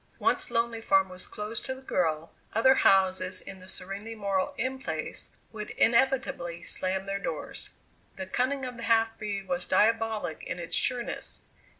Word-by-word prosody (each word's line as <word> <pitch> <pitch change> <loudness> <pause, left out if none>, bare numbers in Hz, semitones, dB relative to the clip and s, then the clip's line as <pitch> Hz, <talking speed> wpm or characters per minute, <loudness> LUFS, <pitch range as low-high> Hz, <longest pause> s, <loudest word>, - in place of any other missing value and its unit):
Once - - +2
Lonely 230 0 0
Farm 195 -3 +4
was 185 0 -5
closed 210 +2 -4
to 260 - -2
the 260 - -12
girl, 165 -8 0 0.2
other 260 +4 +6
houses 190 -4 +4
in 195 -1 -9
the 185 - -13
serenely 195 +4 -5
moral 200 -3 0
In 260 +2 -1
Place 160 -10 -4 0.2
would 210 -1 -6
inevitably 250 -7 +2
slam 190 +1 -1
their 195 0 -2
doors. 160 -6 -4 0.4
The 190 - -5
cunning 260 +7 0
of 250 -1 -6
the 235 - -7
half 225 0 +4
breed 200 -2 -3
was 180 -1 0
diabolic 220 -3 +2
in - - -4
its 170 -1 -2
sureness. 245 -2 -1
205 Hz, 165 wpm, -29 LUFS, 185-230 Hz, 0.4 s, other